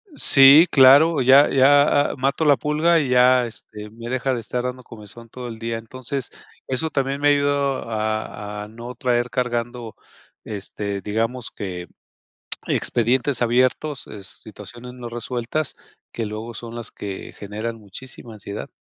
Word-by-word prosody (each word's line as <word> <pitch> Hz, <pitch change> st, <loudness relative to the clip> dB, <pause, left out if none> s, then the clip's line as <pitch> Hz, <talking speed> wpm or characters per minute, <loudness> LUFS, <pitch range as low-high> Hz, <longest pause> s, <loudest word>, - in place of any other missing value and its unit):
Sí, 140 Hz, +5 st, +7 dB
claro, 140 Hz, +3 st, +6 dB
ya 135 Hz, +3 st, +6 dB
ya 145 Hz, +2 st, +4 dB
a -, -, -7 dB
mato 135 Hz, +4 st, 0 dB
la 145 Hz, -3 st, +5 dB
pulga 155 Hz, +6 st, +2 dB
y 145 Hz, -, -1 dB
ya, 125 Hz, 0 st, +5 dB
este, 105 Hz, -2 st, -10 dB
me 115 Hz, +1 st, -9 dB
deja 130 Hz, +1 st, -1 dB
de 120 Hz, -, -3 dB
estar 120 Hz, +2 st, -4 dB
dando 125 Hz, 0 st, -5 dB
comezón 115 Hz, 0 st, -12 dB
todo 125 Hz, +1 st, -8 dB
el 115 Hz, -2 st, -8 dB
día. 115 Hz, 0 st, -4 dB
Entonces 130 Hz, +3 st, -6 dB, 0.4 s
eso 130 Hz, +5 st, -2 dB
también 135 Hz, -1 st, -2 dB
me 145 Hz, -, +4 dB
ha -, -, +6 dB
ayudado 140 Hz, -3 st, 0 dB
a 110 Hz, -1 st, -4 dB
a 105 Hz, -, -9 dB
no 120 Hz, +3 st, -9 dB
traer 120 Hz, 0 st, 0 dB
cargando, 120 Hz, -2 st, -3 dB, 0.5 s
este, 100 Hz, -1 st, -5 dB
digamos 115 Hz, +4 st, -2 dB
que 90 Hz, -3 st, -7 dB, 0.8 s
expedientes 125 Hz, +2 st, 0 dB
abiertos, 130 Hz, +4 st, 0 dB
eh, 105 Hz, -, -9 dB
situaciones 120 Hz, +5 st, -10 dB
no 125 Hz, -1 st, -8 dB
resueltas, 120 Hz, +5 st, -3 dB, 0.3 s
que 115 Hz, -2 st, -4 dB
luego 110 Hz, +2 st, -6 dB
son 115 Hz, +1 st, -8 dB
las 120 Hz, -2 st, -7 dB
que 100 Hz, -2 st, -7 dB
generan 110 Hz, +3 st, -6 dB
muchísima 115 Hz, +3 st, -10 dB
ansiedad. 105 Hz, -1 st, -8 dB
120 Hz, 155 wpm, -22 LUFS, 110-135 Hz, 0.8 s, Sí